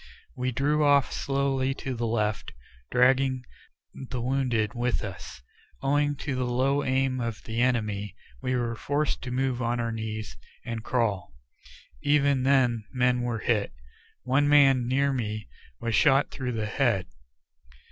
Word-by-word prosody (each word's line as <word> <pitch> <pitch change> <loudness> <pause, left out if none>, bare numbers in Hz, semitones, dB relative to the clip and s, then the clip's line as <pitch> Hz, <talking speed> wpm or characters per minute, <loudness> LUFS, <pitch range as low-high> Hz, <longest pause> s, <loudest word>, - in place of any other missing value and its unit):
We 130 0 -1
drew 145 +4 +1
off 145 -2 +4
slowly 135 -1 0
to 135 - -4
the 120 -1 -2
left, 105 -2 -1 0.4
dragging 130 +1 +3 0.5
the 130 -1 -6
wounded 120 -4 0
with 120 -1 -1
us. 95 -9 -8 0.4
Owing 145 +1 +2
to 145 - -1
the 130 0 -1
low 135 +4 +1
aim 130 0 +1
of 115 -2 -4
the 115 +1 -2
enemy, 105 -6 0 0.3
we 130 -1 -1
were 120 -1 -1
forced 145 +5 -1
to 125 - -6
move 130 0 -1
on 120 0 0
our 115 -1 -1
knees 110 -1 -5 0.3
and 115 -1 -4
crawl. 100 - -1 0.7
Even 140 -2 +3
then 125 -4 +3
men 125 -1 +2
were 120 -2 -2
hit. 105 - +1 0.5
One 135 +3 +2
man 135 -4 +5
near 140 +2 +2
me 110 -4 -3 0.3
was 115 -1 -2
shot 135 +5 +4
through 125 -2 -4
the 110 -2 -2
head. 110 -3 +1
125 Hz, 145 wpm, -27 LUFS, 115-135 Hz, 0.7 s, man